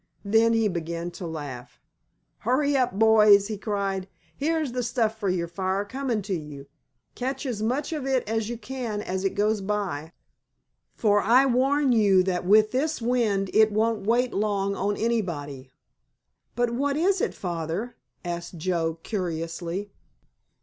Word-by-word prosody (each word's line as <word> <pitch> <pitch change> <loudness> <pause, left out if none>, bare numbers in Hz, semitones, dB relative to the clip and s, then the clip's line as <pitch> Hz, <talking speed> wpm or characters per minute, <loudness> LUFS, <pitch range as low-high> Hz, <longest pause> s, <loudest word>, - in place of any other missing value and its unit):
Then 225 +3 +4
he 225 -1 +3
began 170 -1 -4
to 175 0 -7
laugh. 145 -6 -7 0.6
"Hurry 280 +5 +1
up, 250 -7 +1
boys," 215 -2 +6
he 215 - -2
cried, 195 -3 -2 0.3
"here's 310 -1 -1
the 250 +1 -2
stuff 230 -2 -1
for 200 -3 0
your 175 -2 -1
fire 190 +3 -2
coming 250 -2 -2
to 195 0 -3
you! 150 -4 -6 0.5
Catch 265 +2 -3
as 235 -5 -3
much 255 +8 -1
of 290 -4 -3
it 260 -4 0
as 220 0 -1
you 240 - -4
can 235 -4 -4
as 190 +1 -3
it 195 - -1
goes 210 +1 +1
by, 190 -6 -3 0.8
for 205 -2 +3
I 245 +6 +5
warn 270 +2 +2
you 200 -5 +4
that 180 -1 -1
with 215 +2 +5
this 300 +5 0
wind 225 -5 0
it 220 0 +5
won't 215 -1 0
wait 245 +2 +2
long 200 -1 0
on 205 +2 -1
anybody." 155 - -2 0.9
"But 240 0 +1
what 280 +4 0
is 375 +4 +2
it, - - -1
Father?" 175 +6 -4 0.3
asked 170 0 -5
Joe 165 -1 -1
curiously. 175 0 -4
210 Hz, 155 wpm, -26 LUFS, 185-240 Hz, 0.9 s, boys